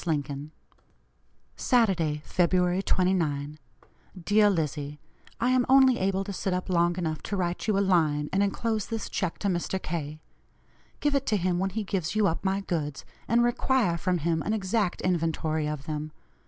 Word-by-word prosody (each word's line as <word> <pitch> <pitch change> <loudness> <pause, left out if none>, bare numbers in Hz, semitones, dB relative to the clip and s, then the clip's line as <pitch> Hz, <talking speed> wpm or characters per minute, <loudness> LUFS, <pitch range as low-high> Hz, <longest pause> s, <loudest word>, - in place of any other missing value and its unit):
LINCOLN." 145 -2 -2 1.1
"SATURDAY, 175 -11 +1
Feb. 180 +1 +2
29. 155 -6 0 0.7
"DEAR 210 0 +5
LIZZIE: 150 -4 -2 0.4
I 245 +2 +2
am 255 -1 +3
only 265 -2 +6
able 195 0 0
to 200 0 -6
sit 185 0 -1
up 185 +1 -3
long 175 0 +2
enough 160 -3 -2
to 205 - -4
write 175 +1 -2
you 210 -2 +2
a 200 - +2
line 155 -5 +2
and 195 - +2
enclose 215 +1 -1
this 225 -2 -4
check 180 -3 -2
to 205 - -2
Mr. 185 +1 -1
K. 155 -3 -5 0.8
Give 290 -1 +1
it 275 -1 0
to 215 - +2
him 180 -1 0
when 190 +1 0
he 215 +3 -3
gives 190 -2 -2
you 215 -1 +3
up 165 -3 0
my 195 0 0
goods, 155 -7 -3 0.2
and 235 +1 +3
require 240 -5 +2
from 180 +1 0
him 165 0 0
an 215 - -1
exact 200 -2 0
inventory 160 -3 0
of 150 -2 -4
them. 155 0 -4
180 Hz, 170 wpm, -27 LUFS, 155-205 Hz, 1.1 s, only